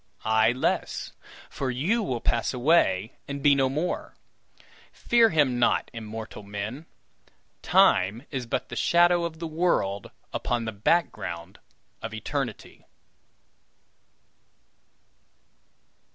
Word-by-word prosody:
Ay, 110 +1 +4
less, 125 +2 -2 0.4
for 135 - -4
you 165 - 0
will 130 - -2
pass 120 +2 0
away 120 - +2
and 140 0 -5
be 145 - +6
no 135 -1 +2
more. 155 +7 -3 0.8
Fear 235 -1 +3
him 145 - +2
not, 120 - +2
immortal 110 -1 -7
men. 105 +9 -6 0.7
Time 105 +8 +3
is 130 -4 -4
but - - -2
the - - -6
shadow 175 0 +3
of 165 -1 -5
the 165 - -5
world 155 - 0 0.2
upon 120 -1 -1
the 110 - -3
background 100 - -1 0.4
of 115 -1 -6
Eternity!" 120 +1 -5
125 Hz, 110 wpm, -26 LUFS, 110-160 Hz, 0.8 s, be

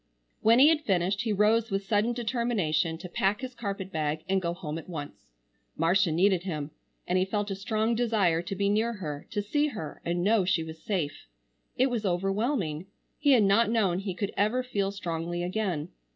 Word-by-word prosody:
When 225 +2 +5
he 280 +4 +8
had 320 -2 +2
finished 195 - +1
he 225 - -1
rose 215 +2 +3
with 195 0 -2
sudden 210 +3 +2
determination 220 -10 0
to 180 - -8
pack 195 +5 0
his 260 -1 -5
carpet 195 -5 -5
bag 155 -2 -2
and 190 0 +1
go 170 -1 -1
home 165 -3 -5
at 165 - -12
once. 150 -4 -7 0.5
Marcia 175 +2 +3
needed 185 +2 +3
him, 155 -5 -4 0.4
and 185 +1 +2
he - - +3
felt 205 +1 -2
a - - -1
strong 215 +3 0
desire 215 -8 +2
to 180 +3 -5
be 200 +1 0
near 220 +3 +1
her, 150 -8 -6
to 205 -2 -2
see 290 +8 +1
her 205 - -7
and 175 +1 -1
know 210 0 +3
she 180 -2 +1
was 160 0 -9
safe. 165 - -3 0.5
It 260 +1 +3
was 235 -3 -1
overwhelming. 195 - -1 0.3
He 285 -2 +5
had 235 -5 +5
not 205 +3 +4
known 200 -6 +2
he 195 -2 -4
could 200 +1 -3
ever 220 +5 +1
feel 200 -6 -1
strongly 175 -3 -3
again. 180 -4 -2
195 Hz, 195 wpm, -28 LUFS, 175-220 Hz, 0.5 s, he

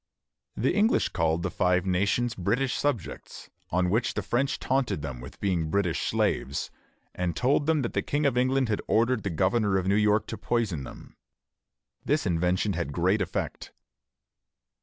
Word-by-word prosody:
The 125 +8 +1
English 210 +4 +2
called 80 0 0
the - - -2
Five 90 0 +1
Nations 100 +6 +1
British 125 +8 0
subjects, 130 - -3 0.2
on 90 +1 +1
which 115 +3 0
the - - -2
French 130 +3 0
taunted 130 - -1
them 65 -5 -5
with 65 - -11
being 85 -5 0
British 90 -1 0
slaves, 70 - -1 0.4
and 90 -2 -2
told 140 +3 +2
them 155 -3 +2
that 120 - -3
the - - +1
King 145 +1 -1
of 135 -3 +2
England 130 +1 +2
had 105 -2 -1
ordered 115 +1 +2
the 100 - -2
governor 95 +4 +1
of 95 - -1
New 95 - +2
York 105 +1 +3
to 110 - -5
poison 100 - -1
them. - - -12 0.9
This 145 +1 +1
invention 90 +3 +1
had 85 -4 -3
great 95 +6 +2
effect. 95 -1 -4
100 Hz, 165 wpm, -27 LUFS, 90-125 Hz, 0.9 s, York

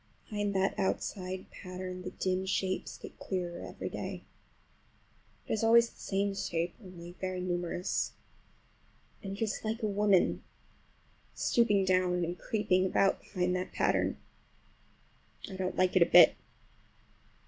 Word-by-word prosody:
Behind 205 -1 -1
that 190 +1 +1
outside 190 -1 -2
pattern 185 -1 -7
the 185 - -5
dim 185 0 -1
shapes 190 0 -1
get - - -11
clearer 175 -2 -3
every - - -6
day. - - -5 1.2
It - - -2
is 220 - 0
always 235 +1 +6
the - - -23
same 200 0 0
shape, 170 -3 -2
only 175 -2 -10
very 185 -1 -2
numerous. 175 0 -1 1.1
And 195 0 -5
it 225 - -1
is 215 - -2
like 225 +2 -3
a - - +2
woman 205 -2 +3 0.9
stooping 205 -5 +3
down 180 -1 +2
and 175 +1 -3
creeping 205 -4 +1
about 195 +1 +2
behind 180 -2 -1
that 185 0 -3
pattern. - - +1 1.3
I 195 - -7
don't 185 -1 -2
like 185 0 +2
it 185 - +5
a 170 - +7
bit. - - +9
185 Hz, 135 wpm, -31 LUFS, 180-200 Hz, 1.3 s, bit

